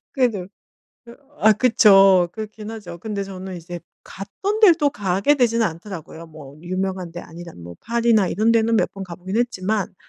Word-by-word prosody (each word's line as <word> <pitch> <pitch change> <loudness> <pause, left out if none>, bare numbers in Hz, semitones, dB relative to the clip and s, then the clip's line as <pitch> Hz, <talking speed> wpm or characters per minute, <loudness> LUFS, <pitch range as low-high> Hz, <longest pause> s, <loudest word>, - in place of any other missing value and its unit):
그래도 240 - 0 0.6
그 235 0 -14 0.2
아 220 - +6
그쵸. 195 -6 +5
그렇긴 215 0 -8
하죠. 190 -6 -9
근데 205 +1 -4
저는 190 -1 -8
이제 175 0 -8 0.2
갔던 395 - -5
데를 385 -7 +7
또 295 -3 +1
가게는 200 +7 0
되지 235 -2 +2
않더라고요. 170 -3 -6
뭐 150 -3 -13
유명한 185 0 -4
데 175 - -7
아니라 170 0 -11
뭐 85 0 -11
파리나 230 -4 +1
이런 220 +6 +1
데는 230 0 +2
몇 - - +1
번 195 -1 -7
가 175 - -9
보긴 185 +4 -6
했지만 215 -5 -2
195 Hz, 340 characters per minute, -21 LUFS, 175-225 Hz, 0.6 s, 데를